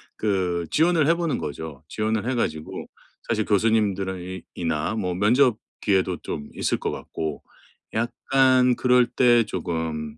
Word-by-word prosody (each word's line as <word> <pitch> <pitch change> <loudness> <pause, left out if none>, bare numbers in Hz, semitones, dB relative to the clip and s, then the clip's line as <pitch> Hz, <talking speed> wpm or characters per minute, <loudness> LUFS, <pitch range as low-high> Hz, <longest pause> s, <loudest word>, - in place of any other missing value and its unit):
그 90 -5 0
지원을 160 -1 +3
해 165 - +4
보는 170 -3 -1
거죠. 75 0 -6
지원을 110 +2 -1
해 130 - 0
가지고 80 -9 -3 0.4
사실 110 -2 0
교수님들은 100 -3 +1
이 95 +1 -7
이나 80 +2 -1
뭐 90 -5 -1
면접 120 +5 +3 0.2
기회도 95 -3 +1
좀 75 -1 -6
있을 - - 0
것 - - -2
같고, 80 -2 -5 0.5
약간 125 +2 +3
그럴 125 0 +4
때 120 -2 +4
조금 80 -5 -4
105 Hz, 265 characters per minute, -24 LUFS, 85-125 Hz, 0.5 s, 해